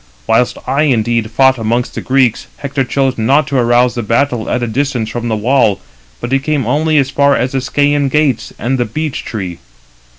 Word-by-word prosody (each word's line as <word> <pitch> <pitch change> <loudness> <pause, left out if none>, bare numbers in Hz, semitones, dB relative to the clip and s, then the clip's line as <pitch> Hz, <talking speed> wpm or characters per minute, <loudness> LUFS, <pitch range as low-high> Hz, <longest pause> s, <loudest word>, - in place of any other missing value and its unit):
Whilst 120 +2 +1
I 135 +3 0
indeed 115 -4 0
fought 130 +2 +3
amongst 115 +2 -1
the - - -5
Greeks, 130 -3 +1
Hector 140 -1 -2
chose 130 0 -1
not 135 +7 +3
to 135 - 0
arouse 120 +1 +3
the 120 - -3
battle 115 +1 0
at 125 - -1
a - - -1
distance 125 -1 -1
from 120 +1 -4
the 110 - 0
wall, 110 -2 +2 0.4
but 120 - -5
he 135 - +3
came 145 -2 -1
[only] 155 +5 +1
as 135 -1 +2
far 140 -1 +3
as 125 +2 -1
the 135 - -1
Scæan 145 +2 +1
gates, 145 -5 0
and 130 +3 -1
the 120 - +1
beech 150 +5 -4
tree. 95 -6 -5
125 Hz, 200 wpm, -14 LUFS, 115-140 Hz, 0.4 s, fought